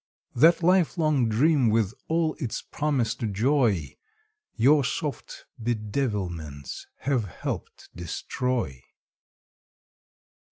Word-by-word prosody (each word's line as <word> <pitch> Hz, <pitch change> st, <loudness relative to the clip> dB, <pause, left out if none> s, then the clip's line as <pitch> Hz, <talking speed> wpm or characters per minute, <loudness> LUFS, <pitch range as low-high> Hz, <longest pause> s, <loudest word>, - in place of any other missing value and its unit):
That 165 Hz, +7 st, +5 dB
lifelong 160 Hz, -7 st, +3 dB
dream 135 Hz, +2 st, +3 dB
with 110 Hz, -2 st, +1 dB
all 160 Hz, -1 st, +1 dB
its 125 Hz, -8 st, -3 dB
promised 145 Hz, -6 st, -1 dB
joy 110 Hz, -, +1 dB, 0.6 s
Your 140 Hz, +5 st, +5 dB
soft 145 Hz, -1 st, -4 dB, 0.2 s
bedevilments 105 Hz, -, -3 dB
have 130 Hz, -6 st, 0 dB
helped 90 Hz, -, -6 dB
destroy. 90 Hz, -, -3 dB
120 Hz, 80 wpm, -26 LUFS, 105-150 Hz, 0.6 s, That